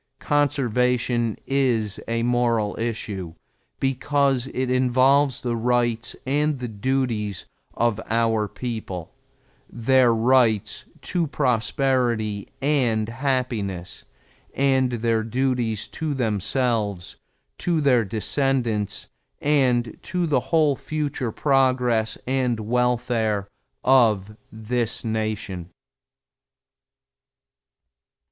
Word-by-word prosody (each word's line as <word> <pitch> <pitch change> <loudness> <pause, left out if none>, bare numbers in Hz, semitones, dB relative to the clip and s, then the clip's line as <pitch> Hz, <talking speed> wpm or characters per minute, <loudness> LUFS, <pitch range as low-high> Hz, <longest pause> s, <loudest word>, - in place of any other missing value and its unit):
Conservation 125 -5 +1
is 120 -7 +1
a 115 0 -1
moral 120 -3 +1
issue 105 -7 -4 0.4
because 135 -1 +1
it 130 0 -1
involves 130 +2 +3
the 120 -2 -1
rights 120 -1 0
and 145 +2 +1
the 125 -1 -4
duties 110 -4 -2 0.3
of 115 -2 +1
our 115 -1 +1
people 105 -8 -6 0.6
their 125 +1 +3
rights 115 -2 +2 0.2
to 175 -3 -1
prosperity 125 -5 0 0.2
and 120 -7 +1
happiness, 115 -8 -2 0.5
and 130 -2 +2
their 115 -1 +1
duties 120 -2 -1
to 155 -3 -3
themselves, 110 -4 -1 0.4
to 170 -2 +1
their 130 -5 +4
descendants, 110 0 -1 0.3
and 125 -6 +1
to 180 -2 -2
the 145 -5 +2
whole 155 -4 +3
future 145 -5 -3
progress 125 -4 +1
and 125 -3 0
welfare 120 -3 0 0.4
of 110 -6 +3 0.2
this 115 +2 -2
Nation. 110 -5 -3
120 Hz, 85 wpm, -23 LUFS, 110-130 Hz, 0.6 s, their